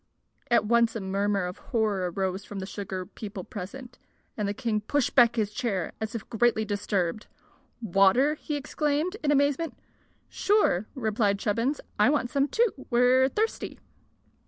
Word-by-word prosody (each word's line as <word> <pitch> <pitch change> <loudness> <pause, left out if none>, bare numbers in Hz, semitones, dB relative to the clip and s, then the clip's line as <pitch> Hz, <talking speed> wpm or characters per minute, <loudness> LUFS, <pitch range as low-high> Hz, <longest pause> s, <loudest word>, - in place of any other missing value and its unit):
At 235 -2 +4
once 235 +1 +3
a - - -2
murmur 195 0 0
of 180 0 -6
horror 210 -6 0
arose 190 +2 -2
from 205 - -8
the 190 - -4
sugar 190 -2 -5
people 205 0 -8
present, 245 +7 -8 0.4
and 210 -2 -2
the 200 - -1
king 225 -3 -1
pushed 285 +6 0
back 235 -2 +5
his 210 -3 -1
chair 205 -7 -2
as 220 +1 -4
if 220 - -5
greatly 230 -1 +2
disturbed. 205 -2 -2 0.6
"Water!" 195 - +4
he 300 0 -5
exclaimed, 295 +5 -1
in 295 - +1
amazement. 285 +3 +1 0.5
"Sure," 395 - +2
replied 215 -4 +1
Chubbins. 230 +8 -1 0.2
"I 210 - +6
want 285 -5 0
some, 280 -1 +2
too. 440 - 0
We're 250 +2 +4
thirsty." 440 +8 -2
225 Hz, 155 wpm, -27 LUFS, 200-265 Hz, 0.6 s, I